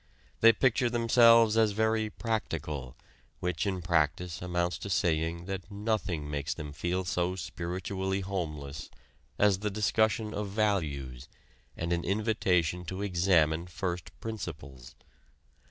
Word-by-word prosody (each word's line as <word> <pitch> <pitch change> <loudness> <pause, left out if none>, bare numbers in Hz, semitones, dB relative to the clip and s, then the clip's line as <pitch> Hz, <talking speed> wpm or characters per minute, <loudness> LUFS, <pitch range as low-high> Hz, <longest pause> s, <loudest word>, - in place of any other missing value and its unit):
They 115 - +8
picture 125 +1 +2
themselves 115 -1 +5
as 110 -2 +3
very 110 0 +1
"practical," 75 - -3 0.4
which 90 -1 -1
in 95 -3 -2
practice 80 +1 0
amounts 90 -1 -1
to 100 - -6
saying 85 -1 0
that 95 -1 -5
nothing 100 -7 -2
makes 75 0 -3
them 75 -3 -7
feel 90 +4 -2
so 90 +1 0
spiritually 95 +2 -3
homeless 75 -7 -5 0.5
as 100 -2 +4
the 105 +1 -1
discussion 110 +1 +1
of 105 -1 -3
values 75 - -1 0.5
and 85 +1 -1
an 85 -1 -1
invitation 90 -4 +1
to 95 +4 -4
examine 85 -3 +2
first 90 -1 -4
principles. 75 - -7
90 Hz, 120 wpm, -30 LUFS, 80-105 Hz, 0.5 s, They